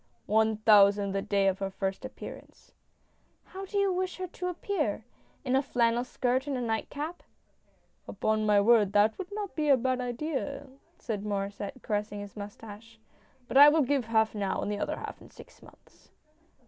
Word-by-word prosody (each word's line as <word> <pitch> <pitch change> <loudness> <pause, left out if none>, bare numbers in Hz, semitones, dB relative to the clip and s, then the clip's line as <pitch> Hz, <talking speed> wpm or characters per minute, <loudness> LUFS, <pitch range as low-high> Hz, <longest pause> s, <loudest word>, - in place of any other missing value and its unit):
" - - -43
One 220 -1 +2
thousand 205 -2 +5
the 195 0 -1
day 200 0 +1
of 190 0 +1
her 195 -1 -2
first 195 0 -4
appearance! - - -10 0.4
" - - -41
"How 385 +1 -6
do 405 - -3
you 395 -1 +2
wish 370 0 -2
her 370 - -3
to 360 0 -6
appear 335 - -2 0.2
— - - -36
in 255 0 +1
a 270 - +4
flannel 240 -3 +1
skirt 255 +2 -1
and 275 -2 -1
a - - -3
nightcap?" 285 +8 -3 0.4
" - - -40
Upon 215 0 0
my 210 -1 +4
word, 215 -2 +4
that 210 +2 +4
would 380 +1 -6
not 410 -1 -5
be 300 -2 -1
a 275 - +6
bad 255 +1 -1
idea," 275 +3 -4 0.3
said. 210 -3 -4
Mauresset, 200 +3 -4
caressing 210 -1 -2
his 205 -1 -9
moustache. 210 +2 -10 0.3
" 260 -2 -34
But 265 - 0
I 290 +1 +10
will 310 0 +3
give 270 -2 0
half 220 -1 +2
now, 200 -3 -2
and 205 - -2
the 205 - -3
other - - -2
half - - -8
in - - -14
six - - -16
months." - - -20
230 Hz, 200 wpm, -29 LUFS, 205-285 Hz, 0.4 s, I